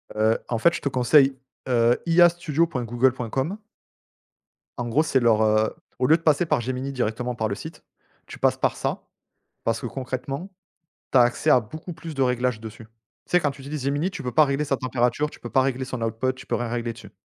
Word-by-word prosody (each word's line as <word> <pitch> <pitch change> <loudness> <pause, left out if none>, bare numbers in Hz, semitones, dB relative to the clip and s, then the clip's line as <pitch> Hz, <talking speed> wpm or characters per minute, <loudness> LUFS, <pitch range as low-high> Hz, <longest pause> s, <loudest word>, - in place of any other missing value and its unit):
Heu, 110 +1 +3
en 120 - -1
fait, 170 +9 +4
je - - -4
te 140 - -1
conseille, 135 +2 +4 0.3
heu, 120 -1 +3
iastudio.google.com 150 - +1 1.2
en 120 -1 -3
gros 135 +7 +2
c'est 135 -4 +2
leur, 115 -3 +3
heu, 110 0 +2 0.2
au 125 - +2
lieu 160 - +6
de - - -20
passer 160 +1 +3
par 150 -6 +1
Gemini 130 +3 -3
directement 125 0 -2
par 110 -2 -1
le 100 - -3
site, 160 +8 -10 0.4
tu - - -10
passes - - +2
par - - 0
ça. - - -3 0.6
Parce 115 0 0
que - - -5
concrètement, 135 - -5 0.6
tu - - +4
as - - +8
accès 120 +6 +2
à 130 - +7
beaucoup 155 +10 -8
plus 165 0 -8
de 135 - -2
réglages 125 -2 +1
dessus. 110 0 -10 0.4
Tu - - -20
sais 180 - +5
quand 145 -4 0
tu 135 0 -13
utilises 140 0 -5
Gemini 145 +7 0
tu - - -7
peux 125 - -3
pas 155 +4 +5
régler 140 +2 -1
sa 135 -2 0
température 130 +3 0
tu - - -15
peux - - -7
pas 135 - +4
régler 130 0 -1
son 125 -2 -5
output 115 +3 -1
tu 130 - -13
peux - - 0
rien 120 - -2
régler 120 0 -2
dessus - - -13
130 Hz, 215 wpm, -24 LUFS, 120-150 Hz, 1.2 s, as